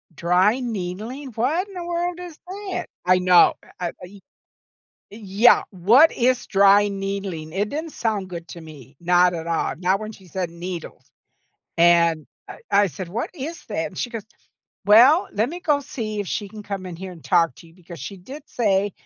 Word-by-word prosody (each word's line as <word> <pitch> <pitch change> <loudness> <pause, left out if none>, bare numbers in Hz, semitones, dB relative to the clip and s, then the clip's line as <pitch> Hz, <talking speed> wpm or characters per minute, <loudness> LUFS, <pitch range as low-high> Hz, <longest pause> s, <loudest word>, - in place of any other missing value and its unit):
dry 185 - +2
needling, 225 +4 -5
what 300 - 0
in 395 - -14
the 350 -1 -5
world 350 0 -2
is 350 -4 -9
that? 380 -1 -5 0.2
I 185 0 +4
know. 180 -1 +6 0.3
I 175 - -2
uh - - -8
e 195 +2 -15 0.9
Yeah. 210 +2 +3
What 220 - +5
is 250 +1 +1
dry 200 +1 +5
needling, 195 -5 -5
it 205 +3 -1
didn't 315 +4 -5
sound 210 -4 -2
good 170 -1 -7
to 170 - -9
me. 145 -4 -14
Not 180 +1 +4
at 165 -1 -5
all, 165 -1 -1
not 185 +3 0
when 215 0 -6
she 190 -2 -16
said 180 0 -4
needles, 170 0 -8 0.7
and 170 -2 +4 0.2
I - - -10
I 205 0 +4
said, 185 +1 -7
"What 220 +7 -4
is 320 +3 -7
that?" - - -2
and - - -12
she 245 - -2
goes, 225 -4 -6 0.6
"Well, 250 - +6
let 220 +5 0
me 350 +2 -7
go 295 -4 +1
see 225 -7 -5
if 200 - -4
she 205 -2 -3
can 215 0 -10
come 195 -2 -5
in 175 - -7
here 185 +1 -8
and 165 - -14
talk 165 -7 +2
to 170 - -15
you 165 - -21
because 175 -3 -12
she 195 +9 -7
did 270 +11 -10
say 205 -4 +1
200 Hz, 190 wpm, -22 LUFS, 180-245 Hz, 0.9 s, know